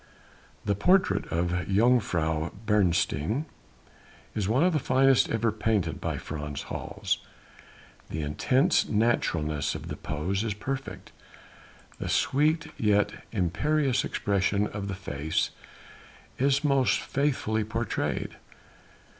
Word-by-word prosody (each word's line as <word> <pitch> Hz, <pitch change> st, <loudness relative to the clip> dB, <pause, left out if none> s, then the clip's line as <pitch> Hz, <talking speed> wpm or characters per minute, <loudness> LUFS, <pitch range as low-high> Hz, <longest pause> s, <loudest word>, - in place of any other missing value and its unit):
That 100 Hz, -1 st, 0 dB
portrait 185 Hz, -, +3 dB
of 85 Hz, +2 st, 0 dB
Jongejuffrouw 90 Hz, -3 st, +1 dB
Beresteyn 105 Hz, -, +1 dB, 0.9 s
is 105 Hz, -2 st, -1 dB
one 130 Hz, +8 st, +3 dB
of 180 Hz, 0 st, +3 dB
the 155 Hz, -, +2 dB
finest 135 Hz, 0 st, +4 dB
ever 115 Hz, 0 st, +1 dB
painted 105 Hz, -7 st, -1 dB
by -, -, -2 dB
Frans 75 Hz, -2 st, -5 dB
Hals, -, -, -3 dB, 0.9 s
the 80 Hz, 0 st, -3 dB
intense 125 Hz, -, +2 dB
naturalness 85 Hz, -, +1 dB
of -, -, -7 dB
the -, -, -4 dB
pose 95 Hz, +7 st, -2 dB
is 110 Hz, -3 st, -2 dB
perfect, 135 Hz, +5 st, -5 dB, 0.9 s
the -, -, -3 dB
sweet 155 Hz, +4 st, +2 dB
yet 105 Hz, -2 st, +3 dB, 0.2 s
imperious 130 Hz, -, +1 dB
expression 100 Hz, +1 st, 0 dB
of 105 Hz, -1 st, -5 dB
the 100 Hz, -, -3 dB
face 80 Hz, -5 st, -2 dB, 0.9 s
is 140 Hz, +2 st, +2 dB
most 140 Hz, -3 st, +3 dB
faithfully 130 Hz, -6 st, 0 dB
portrayed. 115 Hz, 0 st, -2 dB
105 Hz, 110 wpm, -27 LUFS, 90-130 Hz, 0.9 s, finest